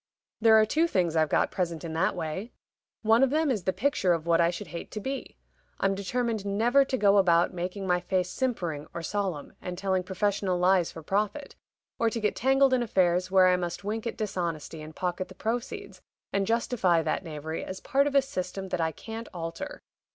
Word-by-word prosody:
There 220 -1 +6
are 215 - +5
two 320 +9 +2
things 175 - 0
I've 155 -1 +3
got - - +2
present 170 -3 -2
in 165 -1 -5
that 165 +4 +1
way: 175 +9 -4 0.5
one 225 +2 +5
of 270 - +5
them 305 +1 +2
is 205 -8 -2
the 190 - +3
picture 195 -3 +1
of 165 -1 -3
what 170 0 +3
I 170 - +4
should 180 +4 -5
hate 170 - -7
to 215 - -3
be. 270 +5 -5 0.4
I'm 195 0 +2
determined 220 +2 -2
never 230 +7 +3
to 265 -1 -2
go 205 -2 +4
about 175 -3 +4
making 185 +3 -4
my 180 -1 +2
face 180 0 -1
simpering 175 - -2
or 170 - -4
solemn, 185 -6 -3
and 180 -1 -5
telling 190 -1 0
professional 190 0 0
lies 180 -1 +3
for 160 - -10
profit; 205 - -2 0.4
or 230 - +3
to 230 - -3
get 210 -1 0
tangled 270 +1 +3
in 255 - +3
affairs 185 -5 +2
where 185 -1 +6
I 180 - +4
must 175 +1 -4
wink 220 +3 -3
at - - -4
dishonesty 170 -7 -3
and 155 0 -10
pocket 180 0 -2
the 190 - -13
proceeds, 235 +6 -4 0.3
and 195 -1 +1
justify 220 -7 +2
that 155 - -1
knavery 160 -1 -5
as 190 - -6
part 280 +1 +2
of 285 - -3
a 275 - +6
system 190 -5 -5
that 180 -2 -1
I 160 0 +1
can't 225 +6 -8
alter. 165 - -6
190 Hz, 210 wpm, -28 LUFS, 175-225 Hz, 0.5 s, There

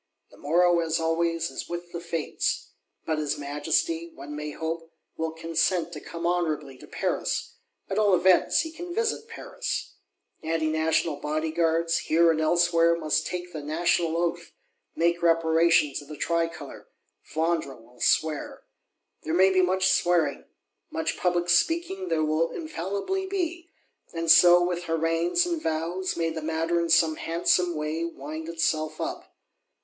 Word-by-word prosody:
The - - -17
morrow, 175 +3 +3
as 165 -1 0
always, 165 0 0
is - - -7
with 175 0 -6
the 170 - -5
Fates! 165 - -2 0.4
But 160 -1 -1
his 150 0 -1
Majesty, 150 +3 -1
one 145 +2 -8
may 150 0 -5
hope, 165 +2 -5 0.2
will 160 0 -2
consent 165 +2 -1
to - - -6
come 170 0 -7
honourably 155 -6 -1
to - - -13
Paris; 470 - -2 0.3
at - - -1
all 205 -3 +4
events, 185 - +4
he 320 -1 -5
can 345 +2 -7
visit 455 0 -1
Paris. - - -5 0.5
Anti 160 0 -1
national 160 -1 +1
Bodyguards, 160 +2 0
here 165 +1 +3
and 160 -1 0
elsewhere, 170 +1 +3
must 155 -2 0
take 180 0 -5
the 155 - -5
National 165 +2 0
Oath; 170 -1 -2 0.4
make 170 +1 +1
reparation 165 -2 +3
to 145 - -5
the 150 +1 -9
Tricolor; 165 +1 -3 0.3
Flandre 160 -3 -2
will 120 +2 -20
swear. 155 -2 0 0.6
There 160 +2 -2
may 190 +2 +5
be 185 0 +4
much 185 +1 +2
swearing; 175 -5 +2 0.4
much 160 0 -2
public 175 -1 0
speaking 195 - +1
there 160 -2 +1
will 155 +2 +1
infallibly 315 - -3
be: 350 -3 -3 0.4
and 165 -1 +2
so, 175 +1 +7
with 175 0 -2
harangues 165 - +1
and 340 -3 -2
vows, 170 +4 -2
may 165 -1 0
the 160 0 -5
matter 160 +2 0
in 170 0 -1
some 160 -1 +4
handsome 175 +1 +1
way, 155 +2 -2
wind 160 0 -6
itself 155 -2 -1
up. - - -5
165 Hz, 150 wpm, -26 LUFS, 160-175 Hz, 0.6 s, so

